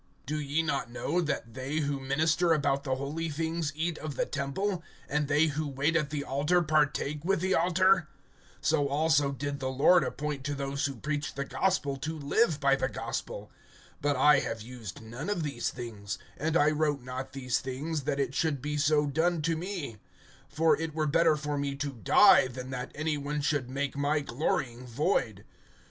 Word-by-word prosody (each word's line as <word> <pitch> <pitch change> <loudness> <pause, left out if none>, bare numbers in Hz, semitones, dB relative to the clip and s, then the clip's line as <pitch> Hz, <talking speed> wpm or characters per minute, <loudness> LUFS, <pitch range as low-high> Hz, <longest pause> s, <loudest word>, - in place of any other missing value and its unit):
(13)Do 150 +2 -2
ye 150 +4 +1
not 140 -6 -1
know 155 +8 -1
that 140 -7 -3
they 130 +3 -4
who 145 -2 0
minister 160 +5 +2
about 140 -2 +1
the 130 -2 0
holy 150 +5 -3
things 160 +1 -2
eat 165 +1 -2
of 155 -3 -5
the - - 0
temple, 170 +7 -2 0.3
and 150 0 0
they 145 +2 +4
who 155 0 -2
wait 140 +4 0
at 150 -3 +1
the 145 -1 -3
altar 150 +6 +1
partake 150 -1 +1
with 195 +1 +1
the 190 +2 +1
altar? 185 -1 +3 0.5
(14)So 145 -3 +2
also 145 -1 +2
did 140 +1 -4
the 130 -1 -2
Lord 145 +7 +5
appoint 145 -2 -3
to 145 0 -1
those 140 +1 -1
who 140 - -5
preach 145 +4 -3
the 140 0 -2
gospel, 140 -5 0
to 155 +4 -4
live 155 +3 +2
by 140 -1 +4
the - - -1
gospel. - - -5 0.5
(15)But 145 0 +1
I 140 +1 +6
have 115 -4 -4
used 115 -5 -9
none 120 - -6
of 175 -6 -1
these 140 -6 -2
things; 110 -5 -6 0.2
and 160 +3 0
I 150 -1 +4
wrote 150 -3 0
not 130 +1 -6
these 125 -2 -1
things, 145 +4 -3
that 140 -1 -1
it 135 -2 0
should 155 -3 0
be 150 +3 -3
so 150 0 +3
done 160 +3 +1
to 165 +1 +1
me; 165 - -5 0.5
for 160 0 +3
it 160 -1 -4
were 155 -1 +1
better 165 +1 +4
for 150 -1 -2
me 140 -1 -2
to 140 +1 -3
die, 125 +1 +6
than 130 +1 -7
that 125 -1 -4
any 155 0 -1
one 145 +1 -2
should 145 -4 0
make 140 +1 -2
my 145 +2 +1
glorying 125 -2 -2
void. 120 - 0
145 Hz, 190 wpm, -29 LUFS, 135-155 Hz, 0.5 s, I